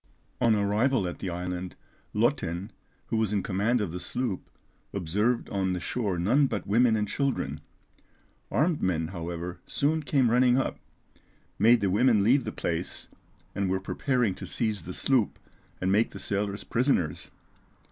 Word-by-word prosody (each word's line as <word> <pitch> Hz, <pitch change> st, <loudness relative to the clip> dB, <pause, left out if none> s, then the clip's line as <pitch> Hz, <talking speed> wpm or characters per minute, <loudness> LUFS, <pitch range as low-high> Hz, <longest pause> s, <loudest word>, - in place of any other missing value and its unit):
On 115 Hz, -2 st, +5 dB
arrival 105 Hz, +2 st, +2 dB
at 90 Hz, -, -6 dB
the 95 Hz, -, -3 dB
island, 90 Hz, +1 st, -4 dB, 0.4 s
Lottin, 105 Hz, -, 0 dB, 0.4 s
who 115 Hz, -, 0 dB
was 110 Hz, -2 st, +1 dB
in 100 Hz, -3 st, 0 dB
command 105 Hz, +5 st, +1 dB
of 100 Hz, -6 st, -2 dB
the 90 Hz, -, -5 dB
sloop, 100 Hz, +3 st, -3 dB, 0.4 s
observed 105 Hz, +6 st, 0 dB
on 95 Hz, -2 st, 0 dB
the 90 Hz, -, -2 dB
shore 100 Hz, -3 st, -2 dB
none 125 Hz, +12 st, +3 dB
but 105 Hz, -7 st, -3 dB
women 115 Hz, +3 st, +4 dB
and 105 Hz, -1 st, 0 dB
children; 85 Hz, -, -1 dB, 0.9 s
armed 155 Hz, +1 st, +1 dB
men, 80 Hz, -3 st, 0 dB
however, 85 Hz, 0 st, -5 dB
soon 155 Hz, +3 st, +1 dB
came 130 Hz, -4 st, +2 dB
running 125 Hz, +1 st, +4 dB
up, 135 Hz, -, -1 dB, 0.8 s
made 115 Hz, +1 st, +6 dB
the 100 Hz, -2 st, +1 dB
women 110 Hz, 0 st, +4 dB
leave 125 Hz, +4 st, +4 dB
the 110 Hz, -, -3 dB
place, 85 Hz, +1 st, -4 dB, 0.4 s
and 100 Hz, -1 st, -1 dB
were 95 Hz, 0 st, +1 dB
preparing 120 Hz, +2 st, 0 dB
to -, -, -8 dB
seize 105 Hz, -7 st, -1 dB
the 90 Hz, -, -5 dB
sloop 125 Hz, -7 st, +1 dB, 0.4 s
and 95 Hz, +1 st, 0 dB
make 105 Hz, +4 st, +3 dB
the -, -, -9 dB
sailors 100 Hz, 0 st, -2 dB
prisoners. 115 Hz, -, 0 dB
105 Hz, 155 wpm, -28 LUFS, 90-125 Hz, 0.9 s, made